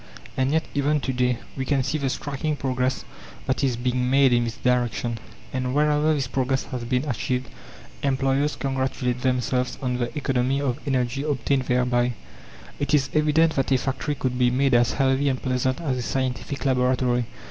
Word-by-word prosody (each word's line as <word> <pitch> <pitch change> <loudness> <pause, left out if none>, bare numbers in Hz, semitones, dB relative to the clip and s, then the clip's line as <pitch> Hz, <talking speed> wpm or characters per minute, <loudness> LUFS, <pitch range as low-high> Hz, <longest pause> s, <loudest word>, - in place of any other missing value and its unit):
And 130 +1 +1
yet 160 +1 +2
even 145 +2 +2
to 135 - -2
day 125 -1 +1 0.2
we 135 - -2
can 135 0 +1
see 155 +4 -1
the 135 -2 0
striking 145 +3 -2
progress 130 -2 -1 0.4
that 130 - -1
is 130 -4 +1
being 125 +1 0
made 135 -1 +5
in 120 0 +3
this 115 - -5
direction; 120 -2 0 0.3
and 130 0 -1
wherever 150 +1 +3
this 140 -3 -1
progress 130 +1 0
has 125 -2 -3
been 125 +4 0
achieved, 125 0 -2 0.5
employers 135 +1 +1
congratulate 130 -2 -1
themselves 125 0 0
on 125 -2 -1
the 120 -1 -1
economy 135 -1 +1
of 135 -2 -1
energy 130 0 0
obtained 140 -2 0
thereby. 125 -1 +1 0.7
It 145 +1 +2
is 135 -2 +1
evident 155 +1 +3
that 135 0 0
a 130 - +5
factory 135 +3 -2
could 130 -2 -2
be 125 -1 +4
made 135 +2 +2
as 120 0 +4
healthy 135 0 +2
and 130 -1 -1
pleasant 130 0 0
as 140 -7 -1
a - - -2
scientific 130 +2 -3
laboratory. 125 -2 +2
130 Hz, 180 wpm, -24 LUFS, 125-140 Hz, 0.7 s, made